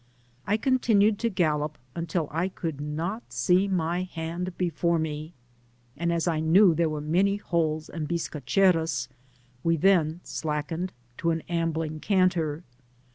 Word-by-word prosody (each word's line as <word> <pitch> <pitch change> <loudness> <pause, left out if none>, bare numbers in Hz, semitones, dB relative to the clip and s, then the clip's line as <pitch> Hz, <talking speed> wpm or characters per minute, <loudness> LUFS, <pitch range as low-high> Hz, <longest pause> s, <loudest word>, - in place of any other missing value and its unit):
I 210 - +3
continued 220 -4 +3
to 230 - +1
gallop 155 -6 0 0.2
until 165 -1 -2
I 170 +5 0
could 160 -6 -5
not 165 +9 -4
see 185 +2 +3
my 175 -2 0
hand 175 0 -5
before 170 -1 +1
me, 155 +1 -4 0.6
and 170 +3 -1
as 170 0 0
I 165 -2 +1
knew 170 +4 +5
there 165 0 +1
were 155 -1 -3
many 185 +7 +2
holes 160 -5 -1
and 155 -3 -5
bisca 165 -3 -3
cheros, 160 -5 +2 0.5
we 165 0 +2
then 170 -2 +3
slackened 160 +4 -3 0.3
to 170 - +1
an 165 -1 0
ambling 165 -2 -2
canter. 180 -5 +1
165 Hz, 140 wpm, -27 LUFS, 155-185 Hz, 0.6 s, knew